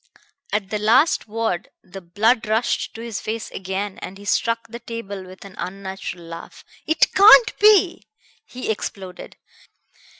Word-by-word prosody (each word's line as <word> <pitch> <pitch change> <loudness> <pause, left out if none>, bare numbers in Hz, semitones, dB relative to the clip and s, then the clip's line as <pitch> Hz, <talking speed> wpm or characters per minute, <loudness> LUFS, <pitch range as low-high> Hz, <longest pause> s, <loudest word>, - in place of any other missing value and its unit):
At 205 -2 -2
the 210 - -1
last 235 +10 +3
word 220 -5 -2
the 190 +1 -10
blood 220 +7 +1
rushed 220 +3 0
to 225 - -7
his 230 -3 -5
face 220 +1 -5
again 190 +1 -4
and 190 - -8
he 205 - -13
struck 230 +2 0
the 235 +1 -9
table 220 -5 -7
with 185 +2 -13
an 195 - -11
unnatural 190 -2 -6
laugh. 165 0 -10 0.2
"It 315 +1 +3
can't 435 +3 +7
be!" 410 -4 +4 0.4
he 250 -3 -4
exploded. 190 -3 -7
210 Hz, 145 wpm, -22 LUFS, 190-230 Hz, 0.4 s, can't